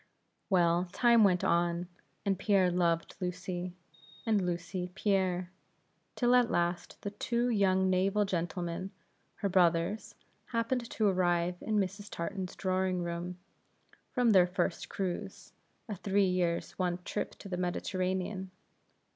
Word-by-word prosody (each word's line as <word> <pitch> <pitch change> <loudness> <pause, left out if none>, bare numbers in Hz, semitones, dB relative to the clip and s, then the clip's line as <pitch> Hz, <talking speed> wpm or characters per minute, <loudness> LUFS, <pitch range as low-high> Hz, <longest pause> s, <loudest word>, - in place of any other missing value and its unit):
Well, 175 -1 +3
time 235 -2 +5
went 185 -3 +4
on; 170 +1 +1 0.4
and 195 -2 +1
Pierre 195 -3 +3
loved 170 -2 +1
Lucy, 180 0 -4 0.5
and 215 -4 +2
Lucy, 180 +1 -3
Pierre; 185 -3 +1 0.6
till 245 0 +3
at 245 -2 +5
last 175 0 -1
the 205 - -3
two 235 +4 0
young 190 -4 +3
naval 195 +3 +2
gentlemen, 175 0 -2 0.5
her 200 - -1
brothers, 180 +2 +2 0.3
happened 235 +1 -1
to 220 - 0
arrive 175 -2 +1
in 215 -1 0
Mrs. 200 +1 -2
Tartan's 185 +2 -4
drawing 185 -1 0
room, 175 +1 -4 0.7
from 245 -3 +3
their 185 -3 +6
first 180 - -2
cruise 185 -3 -4 0.3
a 210 - -4
three 195 +1 +2
years' 180 -2 0
one 180 -1 +1
up 180 +3 -4
the 195 -3 -5
Mediterranean. 185 +1 -2
185 Hz, 125 wpm, -31 LUFS, 175-200 Hz, 0.7 s, their